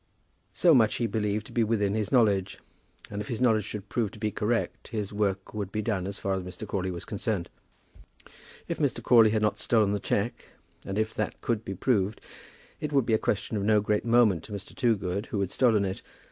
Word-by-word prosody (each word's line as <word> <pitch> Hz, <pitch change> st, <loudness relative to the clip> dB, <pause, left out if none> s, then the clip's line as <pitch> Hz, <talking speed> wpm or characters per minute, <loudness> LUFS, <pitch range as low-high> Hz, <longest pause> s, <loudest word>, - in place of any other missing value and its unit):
So 170 Hz, -2 st, +4 dB
much 110 Hz, -6 st, +4 dB
he 120 Hz, -, 0 dB
believed 105 Hz, -2 st, -1 dB
to -, -, -12 dB
be 120 Hz, -, +2 dB
within 105 Hz, -3 st, +1 dB
his 105 Hz, -2 st, -1 dB
knowledge, 105 Hz, -7 st, +3 dB, 0.5 s
and 105 Hz, 0 st, -3 dB
if 105 Hz, -, -6 dB
his 115 Hz, -, -3 dB
knowledge 110 Hz, -5 st, +3 dB
should 105 Hz, -2 st, -6 dB
prove 115 Hz, -2 st, -1 dB
to -, -, -11 dB
be 105 Hz, 0 st, -1 dB
correct, 115 Hz, +3 st, -1 dB
his 105 Hz, -3 st, -4 dB
work 100 Hz, -2 st, -1 dB
would 100 Hz, -3 st, -4 dB
be 105 Hz, 0 st, -2 dB
done 100 Hz, -4 st, -1 dB
as 100 Hz, -, -5 dB
far 95 Hz, -, -1 dB
as 95 Hz, -, -1 dB
Mr. 90 Hz, +4 st, -8 dB
Crawley 95 Hz, -2 st, -2 dB
was 85 Hz, -2 st, -6 dB
concerned. 105 Hz, -4 st, -3 dB, 1.2 s
If -, -, -3 dB
Mr. -, -, 0 dB
Crawley 115 Hz, -3 st, +6 dB
had 110 Hz, 0 st, 0 dB
not 105 Hz, 0 st, +1 dB
stolen 110 Hz, -4 st, +2 dB
the 105 Hz, -, 0 dB
cheque, 100 Hz, +4 st, -2 dB, 0.4 s
and 95 Hz, -, -4 dB
if 110 Hz, 0 st, 0 dB
that 110 Hz, -, -3 dB
could 115 Hz, -2 st, -1 dB
be 95 Hz, -, -5 dB
proved, 105 Hz, -1 st, +1 dB, 0.6 s
it 150 Hz, -, -3 dB
would 135 Hz, -4 st, +3 dB
be 115 Hz, -, +1 dB
a 110 Hz, -, +4 dB
question 105 Hz, +1 st, -1 dB
of 100 Hz, -, -2 dB
no 105 Hz, +1 st, +4 dB
great 105 Hz, 0 st, 0 dB
moment 115 Hz, -8 st, +4 dB
to 105 Hz, -, -9 dB
Mr. 100 Hz, -1 st, -7 dB
Toogood 100 Hz, -4 st, 0 dB
who 105 Hz, -, -3 dB
had 100 Hz, -2 st, -1 dB
stolen 110 Hz, -6 st, +3 dB
it. 95 Hz, 0 st, -4 dB
105 Hz, 220 wpm, -28 LUFS, 100-115 Hz, 1.2 s, Crawley